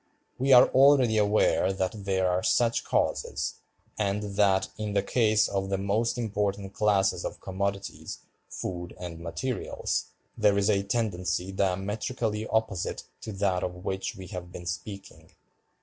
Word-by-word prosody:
We 135 +2 +2
are 125 -1 +9
already 130 -4 +5
aware 105 -2 +3
that 95 -1 -1
there 95 -1 +1
are 90 0 +1
such 115 +3 +2
causes, - - -1 0.4
and 100 0 -1
that, 100 -2 +3
in 105 -1 -4
the 100 -1 +2
case 110 -1 +3
of 95 -1 -2
the 100 - 0
most 105 +5 0
important 100 -3 -2
classes 100 -2 +2
of - - -5
commodities, 100 +1 -4 0.3
food, 90 -1 -5
and 85 -2 -6
materials, 115 +10 -2 0.3
there 105 -3 +3
is 100 +1 +3
a 100 -1 +2
tendency 95 -3 -1
diametrically 105 +4 -1
opposite 110 -5 -1 0.2
to 110 - -6
that 95 -2 0
of 90 +1 -5
which 95 0 -2
we 95 - -9
have 90 -1 -7
been 90 - -8
speaking. 95 +3 -7
100 Hz, 145 wpm, -28 LUFS, 95-110 Hz, 0.4 s, are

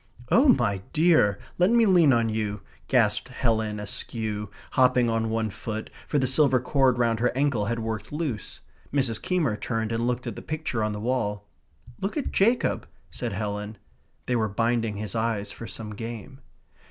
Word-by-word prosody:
"Oh, 265 +6 +6
my 110 - +3
dear, 155 - +4 0.2
let 180 +2 +5
me 235 0 +5
lean 175 -7 +5
on 115 -2 +3
you," 105 -2 -2 0.3
gasped 115 -4 +2
Helen 110 -4 0
Askew, 105 0 -4 0.2
hopping 125 -2 +4
on 115 0 0
one 110 -1 -1
foot, 110 +1 -5 0.2
for 150 - 0
the 135 - +2
silver 130 0 +4
cord 130 0 +2
round 115 -2 +1
her 120 +1 +3
ankle 135 -7 +1
had 115 +2 -1
worked 110 -2 -4
loose. 145 -9 -4 0.3
Mrs. 130 -6 0
Keymer 165 -12 +1
turned 110 +1 -2
and 115 +1 0
looked 125 0 -1
at - - -4
the - - -7
picture 150 -8 -2
on 105 0 -1
the 105 - -5
wall. 105 -3 -1 0.5
"Look 195 +9 -3
at 290 - -2
Jacob," 235 +5 +2 0.2
said 120 -4 -4
Helen 105 +1 -4 0.5
(they 125 - 0
were 110 -2 +1
binding 115 0 0
his 105 -1 -4
eyes 110 -3 -1
for 115 - -8
some 105 -2 -7
game). 115 +3 -7
115 Hz, 175 wpm, -26 LUFS, 105-130 Hz, 0.5 s, Oh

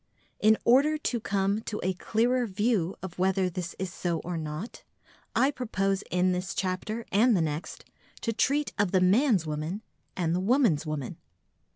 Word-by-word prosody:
In 215 +1 +5
order 280 +6 +5
to 250 -5 -2
come 200 0 0
to 215 -1 -5
a 185 +1 +1
clearer 235 +6 +1
view 200 -3 0
of 180 -1 -7
whether 190 0 +2
this 175 -1 -5
is 185 -2 -4
so 170 -2 -1
or 175 0 -4
not, 155 +6 -6 0.5
I 270 - +4
propose 195 -7 -1
in 180 +1 +2
this 180 +1 -3
chapter 195 +5 -2
and 220 +2 +4
the - - +1
next 155 0 -4 0.4
to 230 - -1
treat 280 +6 +1
of 205 -2 +1
the 190 - +5
man's 195 - +3
woman 155 +7 -4 0.3
and 170 -3 0
the 180 - +1
woman's 195 - +2
woman. 150 -4 -4
190 Hz, 170 wpm, -28 LUFS, 180-230 Hz, 0.5 s, In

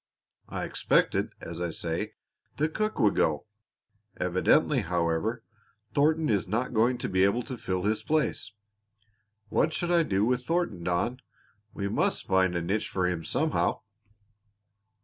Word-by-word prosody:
I - - -3
expected, - - +1
as 85 +1 -6
I 85 - -1
say, 80 0 -3 0.4
that 155 +2 0
Cook 215 0 -1
would 110 -6 +3
go; 75 -2 +1 0.7
evidently, 90 0 +3
however, 85 +7 -1 0.5
Thornton 155 +2 +3
is 100 -5 +1
not 115 +6 -1
going 120 +3 +3
to - - -3
be 95 0 +2
able 100 +5 +2
to 130 - -6
fill 95 -5 -3
his 105 +1 +1
place. 150 -4 0 1.0
What 155 - +2
shall 175 +2 0
I 170 - +5
do 100 -9 +1
with 125 +1 +1
Thornton, 165 - -1
Don? 90 +9 0 0.6
We 100 - -2
must - - 0
find 95 -1 +2
a 85 - -1
niche 100 +6 -1
for 95 -1 0
him 90 -2 -1
somehow." 155 - 0
105 Hz, 150 wpm, -28 LUFS, 90-130 Hz, 1.0 s, I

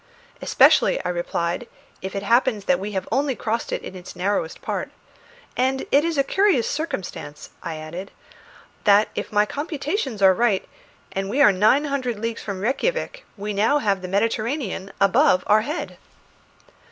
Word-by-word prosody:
"Especially," - - +4
I - - 0
replied, 175 +4 -2 0.3
"if 190 +1 -6
it 195 - -3
happens 230 -1 +2
that 275 - +2
we 210 +2 -5
have 190 - -3
only 275 -1 +1
crossed 230 +1 -2
it - - -3
in - - -7
its 180 -1 -10
narrowest 185 -3 -1
part. - - -3 0.7
And 260 +1 0
it 285 +2 +5
is 335 -2 -1
a 275 - +4
curious 380 - +2
circumstance," 185 - -5
I 165 - -5
added, 165 +5 -7 0.8
"that 205 0 +5
if - - -5
my 210 0 +3
computations 290 - -3
are 190 -1 +7
right, 215 -2 +1 0.4
and 195 0 -3
we 255 +7 -1
are 245 -8 +7
nine 215 +10 +3
hundred 260 -5 -2
leagues 230 +2 -3
from 195 -3 -5
Rejkiavik, - - -1
we 205 +1 -4
have 225 +9 +2 0.2
now - - -17
the 185 - -5
Mediterranean 215 +1 -1
above 185 -1 +4
our 215 +1 +4
head." 300 +9 -5
215 Hz, 165 wpm, -23 LUFS, 195-275 Hz, 0.8 s, are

